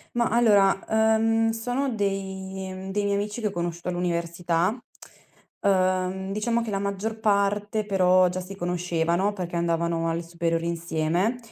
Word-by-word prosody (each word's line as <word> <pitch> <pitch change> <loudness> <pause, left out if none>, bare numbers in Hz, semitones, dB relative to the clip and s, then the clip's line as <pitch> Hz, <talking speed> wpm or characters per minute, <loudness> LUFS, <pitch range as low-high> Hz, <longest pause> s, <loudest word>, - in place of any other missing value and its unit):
Mah 235 -1 +2
allora, 205 -5 +4
uhm, 225 +1 +3
sono 245 +4 -1
dei 190 -1 -4
dei 205 +1 0
miei 200 - +1
amici 210 +3 -3
che 215 - +1
ho 205 - -2
conosciuto 175 -1 -3
all'università. 175 +1 0 0.9
Uhm, 185 0 +1
diciamo 230 +3 0
che 220 - -4
la 195 - -1
maggior 200 +3 -3
parte 205 0 +1
però 185 -2 +4
già 180 - -3
si 190 +2 -8
conoscevano, 175 +1 0
perché 180 -3 -5
andavano 170 0 0
alle 165 +1 -2
superiori 165 0 -2
insieme. 170 +6 0
190 Hz, 140 wpm, -25 LUFS, 175-210 Hz, 0.9 s, allora